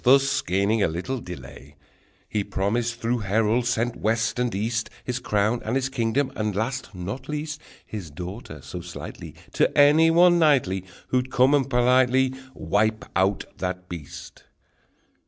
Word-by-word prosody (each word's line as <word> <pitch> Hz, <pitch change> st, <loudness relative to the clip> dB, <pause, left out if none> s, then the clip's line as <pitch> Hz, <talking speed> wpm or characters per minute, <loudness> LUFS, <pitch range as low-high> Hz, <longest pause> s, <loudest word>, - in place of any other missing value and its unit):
Thus 135 Hz, +2 st, +4 dB
gaining 100 Hz, +4 st, +1 dB
a -, -, +4 dB
little 90 Hz, +11 st, -3 dB
delay, 75 Hz, -, -10 dB, 0.5 s
He 105 Hz, -2 st, -1 dB
promised 115 Hz, +5 st, -1 dB
through 120 Hz, 0 st, 0 dB
heralds 110 Hz, +4 st, +1 dB
sent 120 Hz, 0 st, 0 dB
west 110 Hz, +2 st, 0 dB
and 125 Hz, -4 st, 0 dB
east, 115 Hz, +3 st, -1 dB
His 125 Hz, 0 st, -3 dB
crown, 110 Hz, 0 st, 0 dB
and 110 Hz, +3 st, -2 dB
his 135 Hz, 0 st, 0 dB
kingdom, 130 Hz, +2 st, 0 dB
and 105 Hz, -2 st, -2 dB
last, 115 Hz, +1 st, -3 dB
not 100 Hz, +11 st, -6 dB
least, 150 Hz, 0 st, -4 dB, 0.2 s
His 100 Hz, -7 st, -7 dB
daughter 90 Hz, -, -8 dB
so 85 Hz, +6 st, -7 dB
sightly 90 Hz, 0 st, -9 dB, 0.2 s
To -, -, +1 dB
any 150 Hz, +3 st, +6 dB
one 175 Hz, +1 st, +5 dB
knightly 125 Hz, -, +3 dB, 0.2 s
Who'd 130 Hz, 0 st, 0 dB
come 130 Hz, +2 st, +4 dB
and 135 Hz, -2 st, +2 dB
politely 130 Hz, +1 st, +3 dB, 0.2 s
Wipe 110 Hz, +7 st, 0 dB
out 95 Hz, +2 st, +1 dB
that 90 Hz, 0 st, -3 dB
beast! 80 Hz, -5 st, -9 dB
115 Hz, 150 wpm, -25 LUFS, 100-130 Hz, 0.5 s, any